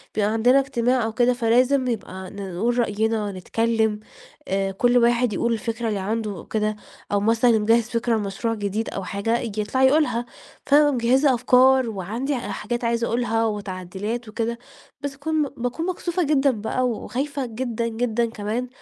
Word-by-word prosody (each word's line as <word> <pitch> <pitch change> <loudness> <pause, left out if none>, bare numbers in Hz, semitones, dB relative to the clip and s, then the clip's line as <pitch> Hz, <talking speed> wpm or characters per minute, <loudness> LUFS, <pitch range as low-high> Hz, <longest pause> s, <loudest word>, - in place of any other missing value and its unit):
بيبقى 210 -1 +2
عندنا 245 +4 +4
اجتماع 250 -2 +1
أو 220 0 -2
كده 245 0 +3
فلازم 250 +3 +2
يبقى 190 -5 -4
نقول 200 +5 -2
رأينا، 215 -1 0
نتكلّم، 220 +3 0 0.5
آآ، 195 0 0
كُلّ 245 +5 +2
واحد 240 -1 +3
يقول 235 +4 0
الفكرة 230 +1 -3
اللي 210 -3 -1
عنده 210 -2 -3
كده، 215 -1 0 0.4
أو 205 - +2
مثلًا 225 +4 +3
اللي 220 - +3
مجهّز 225 +2 +3
فكرة 230 0 0
لمشروع 210 +3 -2
جديد 210 +1 -2
أو 195 - -5
حاجة 200 +5 -1
ييجي 215 -3 -3
يطلع 260 +6 0
يقولها، 265 -4 +3 0.4
فأنا 290 +1 +5
مجهّزة 260 +3 +3
أفكار 255 +1 +4
وعندي 225 +8 -3
حاجات 240 0 -4
عايزة 235 0 0
أقولها 225 -1 0
وتعديلات 205 +2 -4
وكده 235 +2 -3 0.4
بس 285 -1 -3
اكون 310 +2 0
باكون 245 +8 -3
مكسوفة 360 -1 -1
جدًا 280 -2 +3
بقى 245 +3 -1
وخايفة 270 +4 -3
جدًا، 235 0 -3
جدًا، 230 0 0
كمان 225 +2 -3
230 Hz, 155 wpm, -23 LUFS, 215-250 Hz, 0.5 s, فأنا